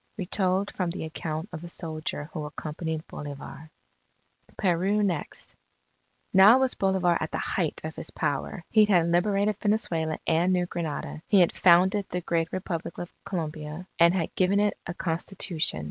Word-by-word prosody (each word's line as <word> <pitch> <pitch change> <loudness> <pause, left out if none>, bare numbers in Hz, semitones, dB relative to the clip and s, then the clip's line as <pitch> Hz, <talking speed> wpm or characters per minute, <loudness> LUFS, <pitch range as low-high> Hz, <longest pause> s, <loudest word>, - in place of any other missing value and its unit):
Retold 190 0 0
from 180 -3 -1
the 170 -1 -4
account 160 +3 -5
of 160 0 -6
a 175 - -7
soldier 155 -2 -4
who 155 - -4
accompanied 155 +1 -5
Bolivar 145 +2 -8 0.9
PERU 195 +3 +2
NEXT 175 -7 -3 0.8
Now 195 +6 +8
was 265 -1 +2
Bolivar 190 -3 +2
at 155 - -2
the - - -3
height 170 -5 -1
of 160 0 -5
his - - -5
power. 145 +5 -2
He 215 -1 +6
had 180 -5 +4
liberated 200 +4 +2
Venezuela 170 -7 0
and 170 +3 +2
New 180 -1 +2
Granada. 150 - -4
He 200 - +5
had 175 - +3
founded 185 +3 +4
the 180 - -2
Great 165 -1 -1
Republic 170 -3 -4
of 175 - -7
Colombia, 155 -1 -5
and 170 +2 +6
had 170 -4 -1
given 190 +2 +2
it 205 0 +2
a 175 - -4
Constitution. 170 - 0
175 Hz, 160 wpm, -27 LUFS, 160-190 Hz, 0.9 s, Now